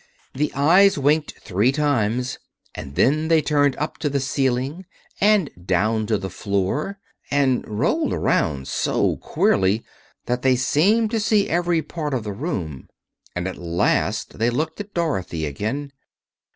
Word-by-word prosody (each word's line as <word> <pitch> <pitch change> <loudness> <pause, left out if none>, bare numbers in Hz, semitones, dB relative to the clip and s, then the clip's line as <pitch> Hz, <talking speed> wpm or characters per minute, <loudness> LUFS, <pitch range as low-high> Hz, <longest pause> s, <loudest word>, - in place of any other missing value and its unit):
The 150 +3 -1
eyes 175 +8 +5
winked 150 +2 +1
three 105 +8 +2
times, 125 -4 0 0.3
and 70 -1 -8
then 155 - +2
they 165 -1 +4
turned 145 -3 +2
up 150 +2 -4
to 150 - 0
the 140 0 0
ceiling 135 +5 -1 0.3
and 205 -6 +3
down 105 +5 +1
to 110 -1 +1
the 95 - -5
floor 100 - -2 0.3
and 135 -3 +2
rolled 160 - 0
around 70 -4 0
so - - 0
queerly 95 +4 +1 0.4
that 125 +1 -1
they 130 -1 +4
seemed 195 - +2
to 225 - 0
see 210 -1 +2
every 175 -1 +1
part 150 -5 -4
of 120 - -2
the 105 -1 -4
room. 95 - -5 0.5
And 90 +1 -2
at 95 - -5
last 85 +4 0
they 115 +1 +3
looked 155 +6 -2
at 205 0 -8
Dorothy 95 - -1
again. 110 - -3
135 Hz, 150 wpm, -22 LUFS, 105-160 Hz, 0.5 s, eyes